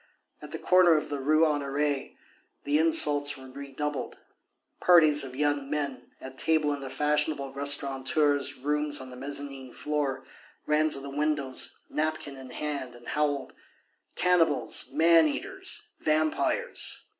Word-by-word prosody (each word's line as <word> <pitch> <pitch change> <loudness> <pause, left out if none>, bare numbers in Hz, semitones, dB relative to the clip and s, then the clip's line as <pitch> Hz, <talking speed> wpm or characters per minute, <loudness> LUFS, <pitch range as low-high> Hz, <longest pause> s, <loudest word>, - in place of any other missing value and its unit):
At - - -10
the - - -6
corner 180 -3 +4
of 150 0 -4
the 145 -1 -4
Rue 155 +4 +2
Honoré, 145 -1 -2 0.5
the 145 +1 +1
insults 145 -3 +5
were 130 -1 -12
redoubled. 140 0 -5 0.6
Parties 155 -5 +5
of 130 -1 -8
young 145 -1 -1
men, 140 -4 -4
at 130 0 -10
table 155 -2 +1
in 145 - -5
the 135 -1 -7
fashionable 150 0 0
restaurateurs' 140 +1 +2
rooms 150 +2 0
on 130 -1 -9
the - - -10
mezzanine 135 -1 -5
floor, 145 -3 -3 0.4
ran 155 +1 +1
to 140 - -3
the 140 0 -9
windows, 145 -2 -1
napkin 155 -2 -3
in 130 -1 -11
hand, 140 -5 -5
and 120 0 -12
howled: 145 -2 -2 0.6
"Cannibals, 180 -2 +2
man 165 0 +4
eaters, 390 - -5
vampires!" 155 - -1
145 Hz, 135 wpm, -27 LUFS, 135-155 Hz, 0.6 s, insults